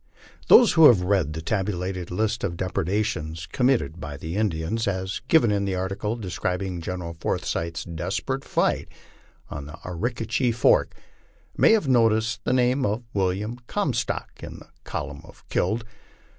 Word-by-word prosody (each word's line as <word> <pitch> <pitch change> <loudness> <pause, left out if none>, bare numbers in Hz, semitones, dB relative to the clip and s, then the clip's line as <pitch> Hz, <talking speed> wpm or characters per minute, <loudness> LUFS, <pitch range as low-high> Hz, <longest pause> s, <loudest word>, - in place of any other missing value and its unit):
Those 240 -4 +8
who 160 -2 +8
have 105 -9 +5
read 90 -6 +1
the 80 +1 -6
tabulated 95 -2 -2
list 110 +6 -1
of 85 -3 -2
depredations 90 -4 -2
committed 120 -4 +1
by 75 -4 -6
the 80 +5 -6
Indians, 105 +1 -1
as 95 0 -2
given 125 -7 +4
in 100 -1 +1
the 100 -1 -1
article 95 +4 -2
describing 90 -2 -3
General 85 -1 -5
Forsyth's 85 +1 -2
desperate 95 - -3
fight - - 0 0.6
on 70 +1 -6 0.2
Arickaree 115 +6 -1
Fork, 120 - +3 0.6
may - - +5
have 210 -10 +2
noticed 115 -3 +2
the - - +1
name 130 +1 +2
of 110 +1 -1
William 100 +4 -1
Comstock - - -2
in - - -8
the - - -15 0.2
col 75 - -4
umn 70 +3 -12
of 85 - -17
killed. 110 +6 0
95 Hz, 145 wpm, -25 LUFS, 85-115 Hz, 0.6 s, Those